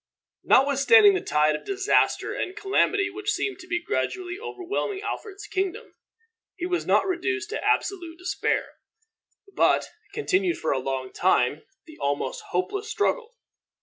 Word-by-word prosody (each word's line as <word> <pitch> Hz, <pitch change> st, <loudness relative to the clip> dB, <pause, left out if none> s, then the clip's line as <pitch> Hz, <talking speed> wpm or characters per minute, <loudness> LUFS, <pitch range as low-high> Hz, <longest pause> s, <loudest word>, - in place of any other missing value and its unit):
Notwithstanding 285 Hz, -, +6 dB
the 375 Hz, -, 0 dB
tide 150 Hz, 0 st, +2 dB
of -, -, -6 dB
disaster 395 Hz, 0 st, +1 dB
and 370 Hz, -, -4 dB
calamity 410 Hz, 0 st, +1 dB
which 410 Hz, +2 st, -4 dB
seemed 400 Hz, -2 st, -2 dB
to 365 Hz, -, -12 dB
be 345 Hz, 0 st, 0 dB
gradually 365 Hz, -1 st, -3 dB
overwhelming 405 Hz, -2 st, -4 dB
Alfred's 405 Hz, -2 st, -6 dB
kingdom, 380 Hz, -1 st, -3 dB, 0.6 s
he 350 Hz, -, -4 dB
was 355 Hz, -1 st, -1 dB
not -, -, +4 dB
reduced 380 Hz, +3 st, -2 dB
to 445 Hz, -, -3 dB
absolute 345 Hz, -4 st, 0 dB
despair, 360 Hz, +1 st, -1 dB, 0.8 s
but -, -, +2 dB, 0.2 s
continued 385 Hz, -4 st, 0 dB
for 160 Hz, -, -1 dB
a 135 Hz, -, +1 dB
long 130 Hz, 0 st, -4 dB
time 150 Hz, -5 st, +1 dB, 0.2 s
the 315 Hz, -2 st, -14 dB
almost 145 Hz, -, -2 dB
hopeless 400 Hz, +2 st, -2 dB
struggle. 450 Hz, +3 st, -1 dB
375 Hz, 140 wpm, -25 LUFS, 335-410 Hz, 0.8 s, Notwithstanding